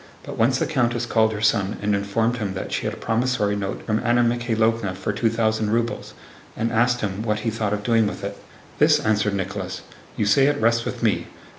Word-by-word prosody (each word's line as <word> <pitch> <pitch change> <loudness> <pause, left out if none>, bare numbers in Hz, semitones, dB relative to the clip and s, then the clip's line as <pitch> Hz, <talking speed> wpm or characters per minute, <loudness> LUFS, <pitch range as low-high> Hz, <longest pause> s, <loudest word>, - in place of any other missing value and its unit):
But - - -7
once 125 +3 +2
the - - 0
countess 120 -5 0
called 110 -2 +2
her 105 -1 -5
son 100 -2 +1
and 105 0 0
informed 110 +4 0
him 100 -4 -3
that 95 - -5
she - - -2
had - - -2
a - - -14
promissory 115 -3 0
note 100 -1 -4
from 110 -1 0
Anna 120 0 +2
Mikháylovna 115 -4 0
for 95 +2 -3
two 115 +3 +1
thousand 110 -1 0
rubles, 115 +1 -2 0.4
and 115 +1 -1
asked 120 +1 +2
him 100 -1 -3
what 105 -1 -1
he 115 - -1
thought 110 -2 -2
of 105 0 -2
doing 115 -1 +3
with - - -6
it. 100 0 -4 0.4
"This," - - +5
answered 105 -2 +1
Nicholas. 95 -1 -4 0.4
"You - - +1
say 135 +6 +4
it 145 0 +1
rests 115 +1 +2
with - - -5
me. - - +1
110 Hz, 220 wpm, -23 LUFS, 105-115 Hz, 0.4 s, This